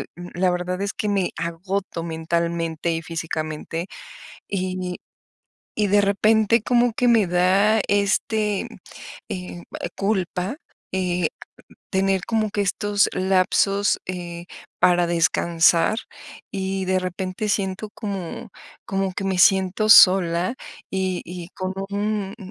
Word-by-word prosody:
um, 175 0 -9
la 185 +1 +2
verdad 180 +1 -3
es 200 0 -2
que 210 - -2
me 195 -3 0
agoto 170 +1 -3
mentalmente 170 0 -2
y 165 - -2
físicamente 160 +1 -4 0.6
y 185 -2 -3 0.8
y 210 -1 +1
de 205 +1 +4
repente 215 +3 +3
como 240 +1 +2
que 245 +2 +1
me 225 -5 +4
da 190 +5 +3
este, 205 +1 +1 0.6
eh, 180 -1 -6 0.2
e - - -3
culpa, 195 +2 -1 0.4
eh, 180 -1 0 0.4
t - - -19 0.2
tener 195 0 +1
como 220 -2 0
que 205 - -2
estos 205 +1 +1
lapsos, 195 +2 +2
eh, 175 -1 -6 0.4
para 175 -1 +4
descansar 170 +3 +3 0.5
y 190 0 -2
de 185 0 +2
repente 185 +3 -4
siento 195 +1 -1
como 200 +2 -5 0.4
como 195 -1 -1
que 190 - -4
me 190 -1 -1
siento 190 +3 +4
sola 185 -2 +6 0.4
y 190 -1 -1
y 175 0 -8
con 185 0 -4 0.2
un, 205 -1 -2
um, 190 -4 -10
190 Hz, 125 wpm, -23 LUFS, 175-200 Hz, 0.8 s, sola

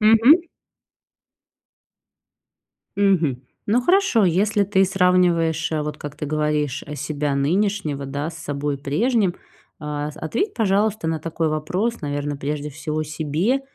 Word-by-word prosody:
Мгм. 225 +10 +6 2.5
Мгм. 170 -10 +2 0.2
Ну 230 +4 +3
хорошо, 360 - +3
если 200 +4 +2
ты 195 -1 +3
сравниваешь, 180 -4 +2
э, 155 -1 0
вот 150 0 -4
как 145 -1 -8
ты 150 - -4
говоришь, 150 -2 -1
э, 150 - -6
себя 145 0 -2
нынешнего, 155 -1 0
да, 145 +4 -3
с 160 - -11
собой 145 -2 -3
прежним, 190 - +1 0.5
а, 150 0 -3
с - - -15
ответь, 240 - -2
пожалуйста, 205 -3 +1
на 160 -1 -1
такой 165 +1 -2
вопрос, 185 +10 -1
наверное, 145 0 -2
прежде 145 +1 -3
всего 155 +1 -3
себе: 155 - -1
160 Hz, 130 wpm, -22 LUFS, 150-200 Hz, 2.5 s, Мгм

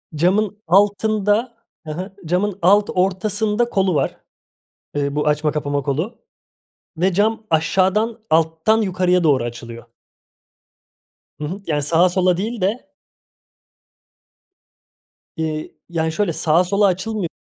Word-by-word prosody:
camın 200 +6 +1
altında, 210 +4 +2 0.3
hı - - -4
hı, 185 +5 -6
camın 185 +4 -1
alt 205 +4 +4
ortasında 210 +5 0
kolu 190 -5 +1
var. - - -1 0.8
Iıı, 140 -1 -1
bu 150 - 0
açma 150 0 +1
kapama 145 -1 -2
kolu 160 - -3 0.8
ve 185 +3 +1
cam 215 +3 0
aşağıdan 190 +7 +1
alttan 160 +7 +2
yukarıya 180 -2 +1
doğru 135 -6 +3
açılıyor. 115 0 -8 1.6
Hı - - -4
hı, 185 +7 -5
yani, 150 -3 0
sağa, 165 +5 +4
sola 180 -1 +2
değil 220 +3 -3
de. 210 +9 -1 2.5
Eee, 155 -1 -3 0.2
yani, 160 -2 -1
şöyle 205 -1 0
sağa, 165 +3 +2
sola 200 +3 +2
açılmıyor. 195 0 -1
185 Hz, 115 wpm, -20 LUFS, 160-205 Hz, 2.5 s, alt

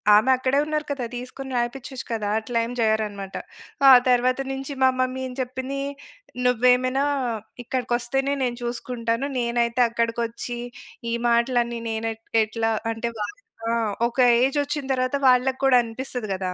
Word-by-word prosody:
ఆమె 220 +5 +4
అక్కడే 260 +2 +1
ఉన్నారు 305 0 -2
కదా! 270 -4 -2
తీసుకొని 260 +2 -7
రాయిపిచచ్చు 245 +2 -3
కదా! 210 -2 -1
అట్లా 230 +2 -4
ఏం 240 - -6
చెయ్యరనమాట. 210 -3 -1 0.5
ఆ - - +11 0.2
తర్వాత 255 +1 +3
నించి 270 +1 -5
మా 260 - +7
మమ్మీ 255 0 0
ఏం 250 - -8
చెప్పిందీ, 260 +2 -4 0.7
నువ్వేమైనా 250 +2 +3 0.6
ఇక్కడకొస్తేనే 255 +3 -1
నేను 240 -1 -1
చూసుకుంటాను. 240 +1 -2
నేనైతే 235 0 +1
అక్కడకొచ్చీ, 235 +1 -2 0.5
ఈ - - 0
మాటలన్నీ 235 0 +2
నేను 225 0 -2
ఎట్ 225 0 -21 0.2
ఎట్లా 225 +1 -1 0.2
అంటే, 225 +1 -3
వాళ్ళకి 415 - -5 0.3
ఆ! 230 - +1 0.4
ఒక 240 - -8 0.2
ఏజొచ్చిన 285 +1 0
తరవాత 255 +1 0
వాళ్ళక్కూడా 260 +1 +4
అనిపిస్తది 240 -1 -6
గదా! 185 -1 -3
245 Hz, 135 wpm, -24 LUFS, 230-260 Hz, 0.7 s, ఆ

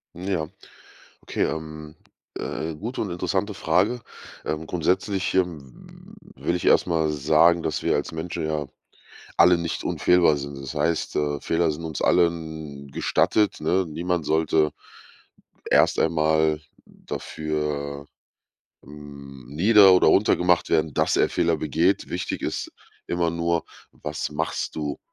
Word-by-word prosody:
Ja. 90 -3 -2 0.7
Okay, - - -2
ähm, 75 -1 -5 0.4
äh, 80 0 -4
gute 115 +11 -5
und 105 - -3
interessante 95 +4 -2
Frage. 95 +10 +1 0.4
Ähm, 80 +1 -3
grundsätzlich, 90 +3 0
ähm, 80 -9 -4 0.2
will 85 - -1
ich 90 - -3
erstmal 80 -3 +3
sagen, 80 +4 +3
dass 75 - -2
wir - - +1
als 75 - -2
Menschen 80 0 -4
ja 75 -2 -2 0.7
alle 90 +1 +6
nicht 85 -1 -3
unfehlbar 85 -4 +3
sind. 70 0 -6
Das 70 -1 -7
heißt, 85 -1 -1
äh, 75 -1 -1
Fehler 85 -1 +1
sind 75 +2 -7
uns 80 -3 -5
allen 80 -4 0
gestattet, 105 +9 +1
ne? 90 +4 +1
Niemand 85 +1 -2
sollte 80 -1 +2 1.0
erst - - +4
einmal 80 -1 +2 0.2
dafür, 75 -2 -4 0.8
hm, 70 -2 -12
nieder 95 - +6
oder 90 - +5
runtergemacht 90 -1 +3
werden, 80 -1 +2
dass - - +1
er - - +3
Fehler - - +1
begeht. 80 +6 0
Wichtig - - -3
ist - - -3 0.4
immer 85 -1 0
nur, 85 0 -1 0.3
was 75 0 -5
machst 75 +2 -3
du 75 -2 -3
80 Hz, 130 wpm, -24 LUFS, 75-90 Hz, 1.0 s, alle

